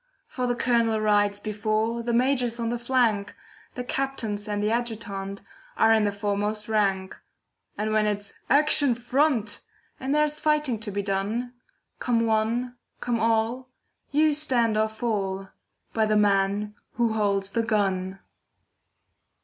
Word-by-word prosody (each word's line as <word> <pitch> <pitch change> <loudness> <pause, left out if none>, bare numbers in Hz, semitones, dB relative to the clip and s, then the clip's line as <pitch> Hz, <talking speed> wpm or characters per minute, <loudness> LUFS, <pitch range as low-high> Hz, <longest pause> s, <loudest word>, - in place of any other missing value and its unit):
For 250 -1 -3
the 245 - 0
Colonel 235 -2 +2
rides 205 -1 +2
before, 215 +2 -1
The 235 +1 -2
Major's 245 -1 +2
on 230 -1 -1
the 240 0 -2
flank, 235 -5 +1 0.4
The 250 - -3
Captains 235 -6 -3
and 205 0 -2
the 210 - +1
Adjutant 210 -4 -3 0.3
Are 225 0 +5
in 220 -1 +3
the 205 - +1
foremost 205 +1 -2
rank. 195 -3 0 0.6
And 215 +1 -1
when 215 -1 +3
it's 205 -1 -3 0.2
'Action 285 -2 +4
front!' 245 -3 0 0.4
And 270 +2 -1
there's 300 0 +2
fighting 300 -6 +1
to 215 -1 -3
be 200 +1 -2
done, 205 +6 -2 0.5
Come 230 -2 +1
one, 230 +3 0 0.2
come 240 -2 -1
all, 230 +3 0 0.4
you 305 +2 +3
stand 250 -7 +1
or 215 0 +2
fall 200 -4 -3 0.4
By 220 -1 +2
the 215 0 +3
man 205 0 +2 0.2
who 235 -2 +1
holds 200 -2 +1
the 230 - +1
gun. 195 -4 0
220 Hz, 140 wpm, -26 LUFS, 205-245 Hz, 0.6 s, Are